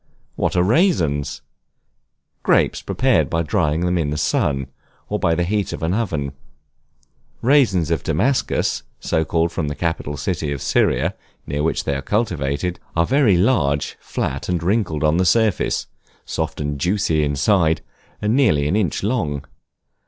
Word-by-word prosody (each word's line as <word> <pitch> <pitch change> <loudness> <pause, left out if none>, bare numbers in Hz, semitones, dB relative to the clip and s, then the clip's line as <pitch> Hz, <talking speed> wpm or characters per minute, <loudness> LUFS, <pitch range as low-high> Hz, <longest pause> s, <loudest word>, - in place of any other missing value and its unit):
What - - -1
are 90 - +4
Raisins? 85 - +1 1.0
Grapes - - +2
prepared - - +1
by 85 0 0
drying 80 -2 0
them 90 0 +1
in 75 -3 0
the 75 - -2
sun, 70 -2 0 0.4
or 105 - -1
by 85 -3 +2
the 85 - +1
heat 100 +3 -1
of - - -6
an 85 +2 +1
oven. 80 -11 -1 1.1
Raisins 115 - +3
of 80 -4 +1
Damascus, 115 - 0 0.2
so 80 - 0
called 85 +1 0
from 80 - -2
the 75 - -3
capital 80 -3 -2
city 75 0 -2
of 70 - -3
Syria, - - +1 0.3
near 70 +1 -2
which 80 - 0
they 70 - -1
are 70 - -3
cultivated, 90 -4 -1 0.2
are 85 0 +3
very 130 -7 +3
large, 80 - +1
flat, - - -3
and 85 -2 0
wrinkled 90 -6 0
on 75 +2 +3
the 90 - +3
surface; 110 -2 +2 0.4
soft - - -3
and 75 -1 -3
juicy 90 -2 +1
inside, 80 +4 +2 0.4
and 105 +3 +2
nearly 75 - +3
an 90 - +1
inch 95 -7 0
long. 80 - -1
85 Hz, 155 wpm, -21 LUFS, 75-100 Hz, 1.1 s, are